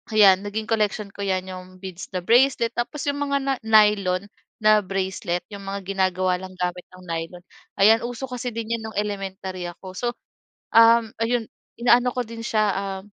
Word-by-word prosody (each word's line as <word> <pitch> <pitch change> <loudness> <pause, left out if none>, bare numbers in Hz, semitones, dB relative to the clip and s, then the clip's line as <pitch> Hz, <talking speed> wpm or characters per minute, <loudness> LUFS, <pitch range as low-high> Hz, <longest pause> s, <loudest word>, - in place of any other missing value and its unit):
ayan 195 -3 +7
naging 205 +2 -3
collection 210 -2 0
ko - - -19
'yan 185 -1 0
'yong 185 0 -9
beads 190 -2 -7
na - - +1
bracelet 240 +2 +3
tapos 255 +5 -3
'yong 285 0 0
mga 280 -1 0
na 270 0 +1
nylon 210 -4 +4 0.4
na 215 0 +6
bracelet 185 -2 -2
'yong 200 - -7
mga 195 +1 -4
ginagawa 185 -1 +1
ng 185 0 -9
gamit 180 0 -3
ng 185 - -14
nylon. 165 +2 -5 0.4
Ayan, 220 +3 +6
uso 245 +2 -5
kasi 250 0 -3
din 230 0 -3
'yan - - -9
nung 220 - -10
elementary 195 -3 -4
ako. 185 +2 -10
So, 245 - -2 0.7
um, 230 0 +6
ayon 230 -1 0 0.3
inaano 245 +1 +4
ko 250 - 0
din 230 +1 -9
siya, 215 -2 +2 0.2
ah, 195 -1 -4
205 Hz, 180 wpm, -23 LUFS, 185-230 Hz, 0.7 s, ayan